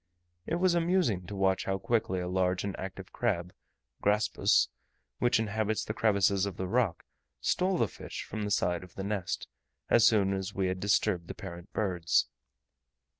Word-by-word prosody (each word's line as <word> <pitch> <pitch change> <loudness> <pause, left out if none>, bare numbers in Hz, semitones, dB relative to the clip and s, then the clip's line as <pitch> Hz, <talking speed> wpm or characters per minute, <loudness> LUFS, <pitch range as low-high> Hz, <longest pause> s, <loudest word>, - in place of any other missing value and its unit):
It 165 - 0
was 180 0 +3
amusing 170 - +1
to 100 - -6
watch 95 -1 +1
how 95 0 0
quickly 100 -2 0
a 90 - -3
large 90 0 +1
and 100 -1 -3
active 95 0 -7
crab 90 -7 -1 0.5
(Graspus), 105 +1 +3 0.5
which 120 - +3
inhabits 110 0 -1
the 110 - -3
crevices 100 -3 +2
of 95 - -6
the 95 - -2
rock, 105 -3 0 0.3
stole 185 - +1
the - - +2
fish - - -7
from 110 - -6
the 105 - -2
side 90 -3 +1
of 90 - -14
the 95 - -4
nest, 100 -4 -2 0.4
as 115 - +7
soon 100 -3 +3
as 95 +1 -4
we 95 -1 +1
had 95 0 -2
disturbed 95 -3 +1
the - - -6
parent 85 -1 -9
birds. 90 -6 +1
100 Hz, 175 wpm, -30 LUFS, 95-110 Hz, 0.5 s, as